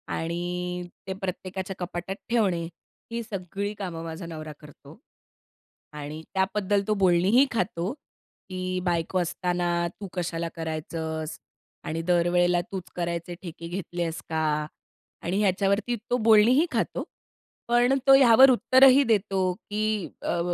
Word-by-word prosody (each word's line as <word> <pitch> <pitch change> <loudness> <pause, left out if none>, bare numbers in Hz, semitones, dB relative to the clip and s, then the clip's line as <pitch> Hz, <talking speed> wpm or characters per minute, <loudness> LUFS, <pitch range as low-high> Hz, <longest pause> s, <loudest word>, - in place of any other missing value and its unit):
आणि 175 +1 -3 0.2
ते 190 - -2
प्रत्येकाच्या 190 0 -4
कपाटात 180 +2 -4
ठेवणे 195 -8 +2 0.5
ही 235 0 -2
सगळी 200 0 -4
कामं 175 -5 -5
माझा 165 +1 -6
नवरा 155 -2 -7
करतो. 150 0 -15 1.0
आणि 150 +1 -7
त्याबद्दल 195 +1 +1
तो 215 - +3
बोलणीही 190 +10 +5
खातो 200 -2 -1 0.6
की 185 0 -3
"बायको 175 +1 0
असताना 175 0 0
तू 200 - -5
कशाला 170 -2 -2
करायचंस? 160 0 -4 0.5
आणि 165 +1 -3
दरवेळेला 175 0 +3
तूच 190 -3 -6
करायचे 170 0 -3
ठेके 170 -1 -8
घेतले 175 -1 -4
आहेस 165 -1 -3
का?" 160 0 -1 0.8
आणि 180 +4 -1
ह्याच्यावरती 200 +4 +1
तो 245 - +3
बोलणीही 230 +7 +5
खातो. - - -1 0.6
पण 240 +2 +4
तो 270 - +9
यावर 260 0 +8
उत्तरही 260 +2 +6
देतो 195 -3 +2
की 215 -1 -2
"अ, 170 - -1
180 Hz, 125 wpm, -26 LUFS, 170-210 Hz, 1.0 s, तो